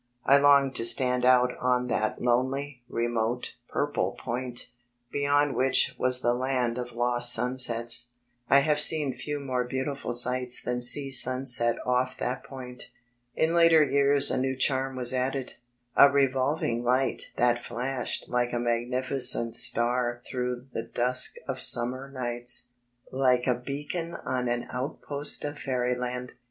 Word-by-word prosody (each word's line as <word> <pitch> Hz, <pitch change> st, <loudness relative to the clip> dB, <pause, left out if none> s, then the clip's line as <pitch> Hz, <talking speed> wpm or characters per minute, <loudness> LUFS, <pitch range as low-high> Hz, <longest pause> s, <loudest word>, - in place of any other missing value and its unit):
I 140 Hz, +1 st, +5 dB
longed 140 Hz, -1 st, +3 dB
to -, -, +1 dB
stand 125 Hz, +1 st, +3 dB
out 125 Hz, 0 st, +3 dB
on 125 Hz, 0 st, 0 dB
that 110 Hz, -2 st, -2 dB
lonely, 130 Hz, +2 st, -2 dB
remote, 120 Hz, +1 st, -3 dB, 0.2 s
purple -, -, -2 dB
point, 125 Hz, 0 st, -5 dB, 0.5 s
beyond 145 Hz, 0 st, 0 dB
which 130 Hz, +1 st, +1 dB
was 125 Hz, 0 st, +3 dB
the 120 Hz, -, +1 dB
land 125 Hz, -1 st, -2 dB
of 120 Hz, -1 st, -7 dB
lost 120 Hz, 0 st, +2 dB
sunsets. 120 Hz, -1 st, +2 dB, 0.4 s
I 140 Hz, -, +5 dB
have 150 Hz, 0 st, 0 dB
seen 150 Hz, -3 st, +3 dB
few 145 Hz, +3 st, -6 dB
more 130 Hz, -3 st, -3 dB
beautiful 130 Hz, +1 st, -5 dB
sights 125 Hz, +1 st, +3 dB
than 125 Hz, 0 st, -4 dB
sea 135 Hz, +3 st, +6 dB
sunset 130 Hz, -2 st, +5 dB
off 125 Hz, +1 st, -1 dB
that 125 Hz, +1 st, -4 dB
point. 130 Hz, -2 st, -9 dB, 0.5 s
In 160 Hz, +1 st, 0 dB
later 165 Hz, -2 st, +5 dB
years 140 Hz, 0 st, +3 dB
a -, -, -1 dB
new 130 Hz, 0 st, -2 dB
charm 130 Hz, 0 st, -1 dB
was 125 Hz, -1 st, +1 dB
added, 130 Hz, 0 st, -3 dB, 0.4 s
a 140 Hz, -, +7 dB
revolv 140 Hz, +1 st, 0 dB
ing 120 Hz, +1 st, -2 dB
light 130 Hz, +1 st, -1 dB
that 120 Hz, 0 st, +1 dB
flashed 125 Hz, +1 st, -3 dB
like 120 Hz, 0 st, -2 dB
a 120 Hz, -, -2 dB
magnificent 120 Hz, 0 st, 0 dB
star 120 Hz, +1 st, +2 dB
through 125 Hz, -1 st, -5 dB
the -, -, -3 dB
dusk 125 Hz, +2 st, 0 dB
of -, -, -3 dB
summer 130 Hz, +3 st, +1 dB
nights, 120 Hz, -1 st, -2 dB, 0.4 s
like 130 Hz, -2 st, +1 dB
a 125 Hz, -, +2 dB
beacon 145 Hz, +7 st, -6 dB
on 125 Hz, -1 st, -3 dB
an 120 Hz, 0 st, -3 dB
outpost 140 Hz, +3 st, -2 dB
of 145 Hz, 0 st, -6 dB
fairyland. 125 Hz, -1 st, -3 dB
125 Hz, 145 wpm, -26 LUFS, 120-135 Hz, 0.5 s, a